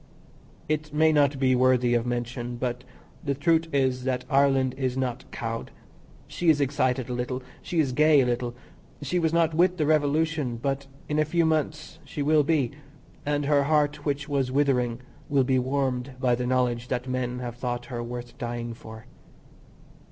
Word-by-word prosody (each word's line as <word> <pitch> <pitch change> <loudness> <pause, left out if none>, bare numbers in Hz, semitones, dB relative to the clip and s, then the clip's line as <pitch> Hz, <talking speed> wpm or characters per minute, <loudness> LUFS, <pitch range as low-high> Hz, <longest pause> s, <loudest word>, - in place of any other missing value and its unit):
It 155 0 -2
may 155 +1 +4
not 145 -2 +3
be 130 -1 +3
worthy 125 -1 +3
of 120 0 +1
mention, 120 0 -3
but 125 0 -3 0.4
the 140 -2 -1
truth 165 +3 +2
is, 130 -2 +1
that 125 -1 -1
Ireland 135 -2 +3
is 130 -1 -2
not 130 -1 -3
cowed. 115 -1 -4 0.6
She 175 - 0
is 155 -2 +5
excited 130 -2 0
a 125 - -4
little. 125 +1 -3 0.2
She 170 - -2
is 140 -5 +2
gay 150 +3 +5
a - - +2
little. 120 0 -2 0.5
She 175 +6 0
was 160 -2 +1
not 165 -1 +2
with 180 +3 +3
the 155 - +1
revolution, 150 -3 +1
but 135 +2 -2 0.2
in 150 0 0
a - - +5
few 165 +2 +1
months 155 -1 -1
she 145 - -4
will 155 +1 +4
be, 145 -4 +1 0.6
and 145 0 0
her 140 -1 +3
heart 150 0 +1
which 145 0 -2
was 135 -3 0
withering 130 -4 +1 0.3
will 140 -2 +3
be 130 0 +2
warmed 130 0 -1
by 125 -1 +2
the 125 +1 -1
knowledge 125 -1 0
that 125 0 -2
men 125 -1 -2
have 120 -1 -6
thought 120 -1 -3
her 120 - -2
worth 120 0 -7
dying 120 -1 -4
for. 110 -1 -11
130 Hz, 180 wpm, -26 LUFS, 125-150 Hz, 0.6 s, is